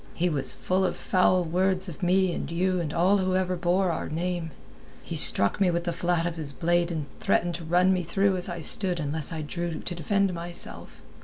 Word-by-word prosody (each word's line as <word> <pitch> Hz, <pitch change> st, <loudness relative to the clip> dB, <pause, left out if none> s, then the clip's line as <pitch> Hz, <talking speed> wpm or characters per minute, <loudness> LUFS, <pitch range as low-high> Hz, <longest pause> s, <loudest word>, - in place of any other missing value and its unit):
He 180 Hz, +1 st, +1 dB
was 140 Hz, -4 st, +3 dB
full 185 Hz, +1 st, 0 dB
of 185 Hz, -, -1 dB
foul 185 Hz, 0 st, +2 dB
words 185 Hz, +3 st, +1 dB
of 170 Hz, -1 st, -9 dB
me 185 Hz, 0 st, +2 dB
and -, -, -4 dB
you 180 Hz, +2 st, 0 dB
and 160 Hz, -4 st, -3 dB
all 185 Hz, +5 st, +3 dB
whoever 185 Hz, -1 st, 0 dB
bore 180 Hz, +1 st, +1 dB
our -, -, -4 dB
name. 170 Hz, +1 st, -2 dB, 0.5 s
He -, -, -6 dB
struck 100 Hz, -, +2 dB
me 190 Hz, -, +4 dB
with 170 Hz, 0 st, -1 dB
the 170 Hz, -, -2 dB
flat 175 Hz, -1 st, 0 dB
of 170 Hz, -1 st, -3 dB
his 145 Hz, -3 st, -4 dB
blade 175 Hz, +4 st, +1 dB
and 160 Hz, -4 st, -3 dB
threatened 175 Hz, 0 st, +1 dB
to 170 Hz, 0 st, -6 dB
run 180 Hz, +3 st, +3 dB
me 185 Hz, -, 0 dB
through 195 Hz, +3 st, +1 dB
as 180 Hz, +1 st, -1 dB
I 170 Hz, -1 st, -5 dB
stood 180 Hz, +1 st, 0 dB
unless 150 Hz, +1 st, -3 dB
I 160 Hz, -2 st, -4 dB
drew 170 Hz, +2 st, -4 dB
to -, -, -5 dB
defend 195 Hz, +3 st, 0 dB
myself. 170 Hz, 0 st, -7 dB
175 Hz, 215 wpm, -26 LUFS, 165-185 Hz, 0.5 s, me